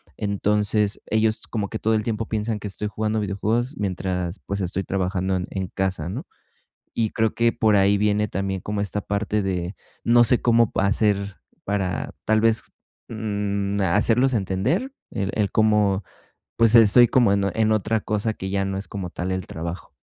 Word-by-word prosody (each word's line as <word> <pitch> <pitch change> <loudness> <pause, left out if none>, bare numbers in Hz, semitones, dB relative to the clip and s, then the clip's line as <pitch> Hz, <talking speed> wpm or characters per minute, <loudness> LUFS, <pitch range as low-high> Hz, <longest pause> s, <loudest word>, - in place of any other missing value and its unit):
Entonces, 105 0 0
ellos 110 0 +1
como 105 -3 -2
que 110 - -5
todo 110 +1 0
el 105 -1 +1
tiempo 115 -1 -2
piensan 110 0 -2
que 105 - -5
estoy 105 +2 -4
jugando 110 +1 -1
videojuegos 110 - -1
mientras, 90 -2 -2
pues, 100 0 -3
estoy 95 +2 -2
trabajando 95 0 -1
en 90 0 -2
en 95 -2 -3
casa, 95 -4 -2
¿no? 90 - -5 0.7
Y 110 -2 0
creo 110 -1 0
que 115 0 +3
por 110 -2 +3
ahí 100 +1 +4
viene 105 +1 +1
también 95 -2 -3
como 105 +2 -3
esta 105 0 -2
parte 105 +1 -1
de, 90 0 -3 0.3
no 120 0 +5
sé 120 +2 +2
cómo 115 -2 +3
pa 95 - +1
hacer 100 -1 +1 0.3
para 95 -2 -2
tal 110 0 +3
vez, 115 0 +2 0.4
mm, 100 -2 -2
hacerlos 115 +8 +3
entender 110 - -1 0.2
el 100 -1 -2
el 105 -2 0
cómo, 105 -2 +3 0.5
pues 115 0 +5
estoy 115 +2 +7
como 120 -6 +4
en 100 0 +1
en 110 -1 +2
otra 110 +1 +1
cosa 105 +1 -1
que 95 - -6
ya 100 0 0
no 95 0 -3
es 100 - -6
como 95 -4 -5
tal 95 +1 -3
el 95 -1 -2
trabajo. 85 +1 -6
105 Hz, 180 wpm, -23 LUFS, 95-110 Hz, 0.7 s, estoy